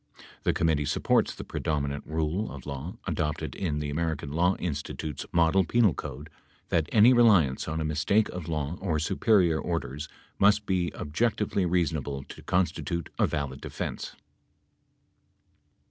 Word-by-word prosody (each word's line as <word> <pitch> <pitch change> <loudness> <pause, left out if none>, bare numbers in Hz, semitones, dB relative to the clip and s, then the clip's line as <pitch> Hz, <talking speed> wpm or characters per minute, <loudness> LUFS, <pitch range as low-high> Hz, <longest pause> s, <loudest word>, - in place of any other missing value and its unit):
The - - +4
committee 80 -3 +1
supports - - +1
the - - -7
predominant 70 -2 -2
rule 80 +6 -1
of 70 -3 -9
law 70 +5 -6
adopted 80 0 -2
in 80 -6 -2
the 75 -1 -3
American 80 -2 -2
Law 90 +5 +2
In 85 -4 -2
stitute's 75 +1 -5
model 85 +3 +4
penal 105 0 +3
code 75 +4 -7 0.4
that 80 -3 +1
any 115 +4 +7
reliance 100 - +4
on 80 +1 -2
a 80 - -1
mistake 80 +8 +2
of 90 -2 -6
law 75 0 -2
or 85 -5 0
superior 85 0 +3
orders 75 -4 -3 0.3
must 105 +1 +4
be 90 -3 0
objectively 100 +3 0
reasonable 80 -6 -1
to - - -10
constitute 85 -2 -1
a - - +4
valid 70 -3 -3
defense. - - -5
80 Hz, 145 wpm, -28 LUFS, 75-90 Hz, 0.4 s, any